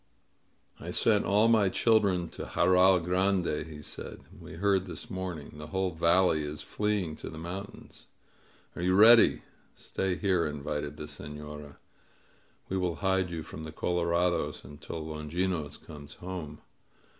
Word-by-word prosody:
"I -, -, -7 dB
sent 105 Hz, -3 st, +2 dB
all 105 Hz, +3 st, +4 dB
my 110 Hz, -4 st, +4 dB
children 100 Hz, -5 st, +2 dB
to -, -, -7 dB
Jarral 95 Hz, 0 st, +4 dB
Grande," 90 Hz, -3 st, +1 dB
he 75 Hz, -2 st, -10 dB
said. -, -, -6 dB, 0.2 s
"We -, -, -11 dB
heard 95 Hz, +2 st, +1 dB
this 115 Hz, +6 st, -8 dB
morning. 90 Hz, -6 st, -5 dB
The 75 Hz, -, -7 dB
whole 95 Hz, +3 st, -1 dB
valley 85 Hz, 0 st, +3 dB
is 75 Hz, 0 st, -5 dB
fleeing 105 Hz, -6 st, -1 dB
to -, -, -7 dB
the 80 Hz, -, -9 dB
mountains. 95 Hz, +5 st, -8 dB, 0.7 s
Are -, -, -5 dB
you 90 Hz, +1 st, +2 dB
ready?" 115 Hz, +3 st, +7 dB, 0.3 s
"Stay 95 Hz, -1 st, -2 dB
here," 90 Hz, -4 st, +1 dB
invited 75 Hz, 0 st, -4 dB
the -, -, -6 dB
Sefiora. 75 Hz, 0 st, -9 dB, 0.9 s
We 95 Hz, -, -2 dB
will 90 Hz, -3 st, -1 dB
hide 95 Hz, -1 st, +2 dB
you 80 Hz, -2 st, -5 dB
from 80 Hz, -, -9 dB
the 80 Hz, -, -7 dB
colorados 85 Hz, +1 st, 0 dB
until 75 Hz, +3 st, -8 dB
Longinos 80 Hz, +1 st, -3 dB
comes 75 Hz, -2 st, -11 dB
home 90 Hz, -5 st, -7 dB
90 Hz, 145 wpm, -29 LUFS, 75-95 Hz, 0.9 s, ready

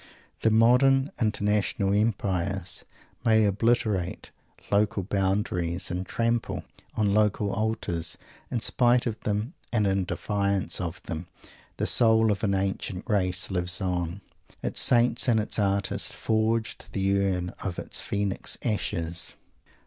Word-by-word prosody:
The 110 Hz, -, +2 dB
modern 125 Hz, +5 st, +4 dB
international 105 Hz, -1 st, 0 dB
empires 95 Hz, -4 st, 0 dB, 0.4 s
may 110 Hz, -1 st, +4 dB
obliterate 105 Hz, -3 st, 0 dB, 0.4 s
local 105 Hz, -1 st, +1 dB
boundaries 95 Hz, -2 st, -1 dB
and 90 Hz, +1 st, -4 dB
trample 115 Hz, 0 st, -1 dB, 0.3 s
on 105 Hz, -2 st, +1 dB
local 105 Hz, -1 st, +1 dB
altars. 100 Hz, -6 st, -2 dB, 0.3 s
In 120 Hz, -, -2 dB
spite 120 Hz, +1 st, +4 dB
of 115 Hz, -2 st, -3 dB
them, 105 Hz, +8 st, -2 dB, 0.2 s
and 110 Hz, -3 st, +1 dB
in 95 Hz, -1 st, +1 dB
defiance 100 Hz, 0 st, -1 dB
of 85 Hz, 0 st, -5 dB
them, 80 Hz, +2 st, -6 dB, 0.5 s
the -, -, -1 dB
soul 110 Hz, -1 st, +5 dB
of 100 Hz, +1 st, -3 dB
an 100 Hz, -2 st, +1 dB
ancient 95 Hz, +1 st, -3 dB
race 95 Hz, -4 st, 0 dB
lives 90 Hz, 0 st, +1 dB
on, 90 Hz, 0 st, -2 dB, 0.4 s
its -, -, +4 dB
saints 120 Hz, 0 st, +4 dB
and 115 Hz, -3 st, +3 dB
its 110 Hz, +1 st, 0 dB
artists 100 Hz, -1 st, 0 dB
forging 110 Hz, 0 st, 0 dB
the 100 Hz, 0 st, +1 dB
urn 90 Hz, -2 st, -1 dB
of 95 Hz, -3 st, -4 dB
its -, -, -2 dB
Phoenix 100 Hz, -1 st, -2 dB
ashes! 85 Hz, -7 st, -2 dB
100 Hz, 125 wpm, -26 LUFS, 95-110 Hz, 0.5 s, soul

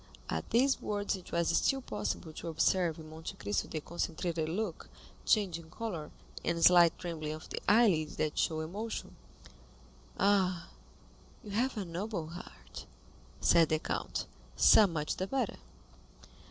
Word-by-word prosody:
At -, -, -3 dB
these 265 Hz, +4 st, +3 dB
words 205 Hz, -1 st, -1 dB
it 185 Hz, -, -11 dB
was 170 Hz, -1 st, +1 dB
still 270 Hz, -1 st, +2 dB
possible 160 Hz, -8 st, -4 dB
to 170 Hz, -, -7 dB
observe 165 Hz, +1 st, +1 dB
in 160 Hz, -1 st, -10 dB
Monte 160 Hz, +1 st, -7 dB
Cristo 100 Hz, 0 st, -1 dB
the 155 Hz, -, -4 dB
concentrated 165 Hz, 0 st, -2 dB
look, 185 Hz, 0 st, -3 dB, 0.4 s
changing 170 Hz, -7 st, +1 dB
color, 170 Hz, -7 st, -5 dB, 0.3 s
and 170 Hz, 0 st, +2 dB
slight 175 Hz, -2 st, +7 dB
trembling 160 Hz, -4 st, -4 dB
of 155 Hz, -, -9 dB
the -, -, -4 dB
eyelid 200 Hz, -9 st, +4 dB
that 155 Hz, -1 st, -1 dB
show 160 Hz, -1 st, +1 dB
emotion. 205 Hz, +8 st, -5 dB, 1.0 s
"Ah, 190 Hz, -3 st, +2 dB, 0.7 s
you 210 Hz, -, -8 dB
have 245 Hz, +4 st, 0 dB
a 200 Hz, -, -2 dB
noble 175 Hz, -1 st, -4 dB
heart," 175 Hz, +2 st, -10 dB, 0.5 s
said 165 Hz, -2 st, +5 dB
the 155 Hz, -, +2 dB
count; -, -, -3 dB, 0.3 s
"so 215 Hz, -, +7 dB
much 155 Hz, -4 st, -2 dB
the 185 Hz, -, -2 dB
better." 265 Hz, +5 st, -1 dB
170 Hz, 140 wpm, -32 LUFS, 160-205 Hz, 1.0 s, slight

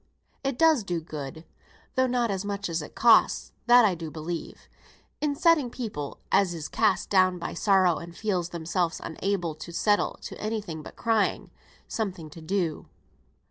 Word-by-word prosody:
It 270 Hz, -2 st, -1 dB
does 320 Hz, -6 st, +4 dB
do 175 Hz, -3 st, -2 dB
good, 155 Hz, 0 st, -7 dB, 0.5 s
though 260 Hz, 0 st, +2 dB
not 245 Hz, -3 st, +1 dB
as 190 Hz, 0 st, -2 dB
much 200 Hz, -2 st, -3 dB
as 165 Hz, -1 st, -1 dB
it 150 Hz, -, -10 dB
costs, 230 Hz, -2 st, +4 dB, 0.2 s
that 240 Hz, -1 st, +8 dB
I 200 Hz, -, +3 dB
do 165 Hz, -2 st, -6 dB
believe, 160 Hz, +2 st, -6 dB, 0.5 s
in 295 Hz, -1 st, 0 dB
setting 305 Hz, -4 st, +3 dB
people 210 Hz, -, -5 dB
(as 185 Hz, -3 st, +3 dB
is 155 Hz, -2 st, -5 dB
cast 180 Hz, -, +1 dB
down 185 Hz, -2 st, +4 dB
by 170 Hz, -, -5 dB
sorrow 185 Hz, -2 st, +3 dB
and 170 Hz, 0 st, -9 dB
feels 185 Hz, -5 st, -1 dB
themselves 170 Hz, 0 st, -1 dB
unable 175 Hz, -1 st, -2 dB
to 155 Hz, +3 st, -9 dB
settle 205 Hz, +4 st, +2 dB
to -, -, -8 dB
any 220 Hz, +1 st, -1 dB
thing 165 Hz, -7 st, -7 dB
but -, -, -11 dB
crying) 225 Hz, -3 st, 0 dB, 0.4 s
something 180 Hz, -8 st, -4 dB
to 165 Hz, -, -11 dB
do. 170 Hz, -1 st, -2 dB
185 Hz, 170 wpm, -27 LUFS, 165-220 Hz, 0.5 s, that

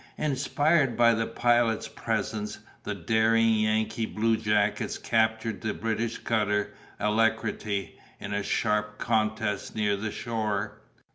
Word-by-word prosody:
Inspired 145 Hz, -1 st, +1 dB
by 120 Hz, -1 st, +6 dB
the 115 Hz, 0 st, -1 dB
Pilot's 120 Hz, -2 st, +2 dB
presence, 105 Hz, -1 st, -3 dB, 0.3 s
the -, -, -3 dB
daring 115 Hz, 0 st, +3 dB
Yankee 110 Hz, +1 st, 0 dB
bluejackets 105 Hz, -2 st, +1 dB
captured 110 Hz, -2 st, 0 dB
the 110 Hz, 0 st, -2 dB
British 115 Hz, +1 st, -2 dB
cutter 105 Hz, -2 st, 0 dB, 0.3 s
Alacrity, 105 Hz, -2 st, 0 dB, 0.2 s
in 100 Hz, -, -5 dB
a 100 Hz, -, 0 dB
sharp 105 Hz, +1 st, 0 dB
contest 110 Hz, -2 st, -1 dB
near 105 Hz, -2 st, +1 dB
the 105 Hz, +2 st, -3 dB
shore. 110 Hz, -3 st, -3 dB
110 Hz, 115 wpm, -27 LUFS, 105-115 Hz, 0.3 s, by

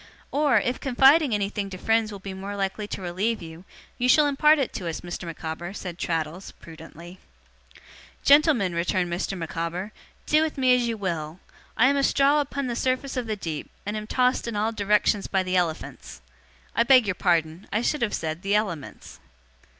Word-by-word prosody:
'Or, 285 Hz, -5 st, +3 dB
if 245 Hz, +5 st, -2 dB
confiding 275 Hz, +2 st, +4 dB
anything 200 Hz, 0 st, -2 dB
to 185 Hz, -, -7 dB
friends 225 Hz, +2 st, +1 dB
will 205 Hz, -, -7 dB
be 195 Hz, 0 st, -8 dB
more 195 Hz, +2 st, -6 dB
likely 200 Hz, +1 st, -3 dB
to 195 Hz, -, -6 dB
relieve 195 Hz, +6 st, -1 dB
you, 165 Hz, +1 st, -11 dB, 0.3 s
you 250 Hz, +1 st, +1 dB
shall 300 Hz, +3 st, +6 dB
impart 300 Hz, +2 st, +4 dB
it 270 Hz, -4 st, -2 dB
to 180 Hz, -, -5 dB
us, 165 Hz, -, -5 dB
Mr. 175 Hz, 0 st, -6 dB
Micawber,' 165 Hz, +2 st, -6 dB
said 180 Hz, -3 st, -7 dB
Traddles, 165 Hz, +2 st, -3 dB
prudently. 165 Hz, +2 st, -13 dB, 1.0 s
'Gentlemen,' 280 Hz, -, +4 dB
returned 175 Hz, +1 st, 0 dB
Mr. 190 Hz, +2 st, -3 dB
Micawber, 170 Hz, +4 st, -4 dB, 0.3 s
'do 305 Hz, +1 st, +3 dB
with 315 Hz, -1 st, -2 dB
me 255 Hz, -1 st, +4 dB
as 245 Hz, -1 st, 0 dB
you 230 Hz, -1 st, -2 dB
will! 170 Hz, -4 st, -4 dB, 0.4 s
I 230 Hz, -, +5 dB
am 280 Hz, +1 st, +2 dB
a 275 Hz, -, +1 dB
straw 280 Hz, +2 st, +3 dB
upon 280 Hz, -1 st, -4 dB
the 240 Hz, -2 st, -3 dB
surface 255 Hz, +2 st, -1 dB
of 250 Hz, -3 st, -3 dB
the 215 Hz, -, -1 dB
deep, 165 Hz, -7 st, -5 dB, 0.2 s
and 205 Hz, +1 st, -3 dB
am 215 Hz, 0 st, -5 dB
tossed 250 Hz, 0 st, +1 dB
in 230 Hz, -, -4 dB
all 215 Hz, +2 st, 0 dB
directions 210 Hz, -1 st, +1 dB
by 190 Hz, -1 st, 0 dB
the 185 Hz, 0 st, -2 dB
elephants 170 Hz, -, -3 dB, 0.5 s
I -, -, +3 dB
beg 250 Hz, 0 st, +6 dB
your 200 Hz, -, 0 dB
pardon; 165 Hz, +1 st, 0 dB
I 215 Hz, +3 st, 0 dB
should 300 Hz, +3 st, 0 dB
have 225 Hz, -3 st, 0 dB
said 160 Hz, +1 st, -4 dB
the 200 Hz, +1 st, 0 dB
elements. 175 Hz, -9 st, -4 dB
205 Hz, 190 wpm, -25 LUFS, 175-250 Hz, 1.0 s, shall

